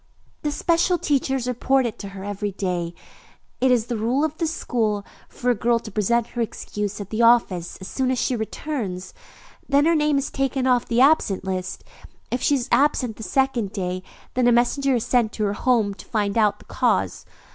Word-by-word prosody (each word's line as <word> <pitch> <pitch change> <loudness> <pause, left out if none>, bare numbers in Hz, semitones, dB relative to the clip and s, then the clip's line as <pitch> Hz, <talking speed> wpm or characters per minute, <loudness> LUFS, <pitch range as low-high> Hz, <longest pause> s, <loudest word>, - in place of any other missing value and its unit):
"The 300 - -1
special 340 +4 +2
teachers 270 -5 0
report 250 -1 +1
to 200 - -6
her 195 -1 -9
every 205 0 -3
day. 180 -3 -3 0.6
It 260 - +3
is 240 -3 +3
the 240 -1 -3
rule 245 +6 +1
of 315 -1 -3
this 330 -2 +1
school 215 -9 -1 0.2
for 250 0 0
a - - +4
girl 235 +2 +2
to 225 -1 -8
present 225 +3 +1
her 240 - -2
excuse 210 -2 -4
at 200 -1 -7
the 220 +1 0
office 230 -7 +3
as 190 - -9
soon 260 +3 -1
as 260 - +1
she 245 +2 0
returns; 220 -5 -4 0.6
then 280 +1 +4
her 335 - +4
name 300 -2 +2
is 275 - -2
taken 270 -1 -1
off 250 -2 +2
the 235 +1 +2
absent 270 -10 +3
list. 185 -1 -4 0.5
If 245 - -1
she 285 - +3
is 255 -2 -2
absent 255 -6 +2
the - - -9
second 245 -4 0
day, 185 -2 -3 0.3
then 250 -1 +2
a - - +6
messenger 255 +3 +2
is 235 - -1
sent 240 -4 +2
to 215 - -2
her 200 -1 +1
home 220 -3 +1
to - - -13
find 205 -2 -1
out 210 -3 +3
the - - -19
cause. - - 0
235 Hz, 200 wpm, -23 LUFS, 205-265 Hz, 0.6 s, a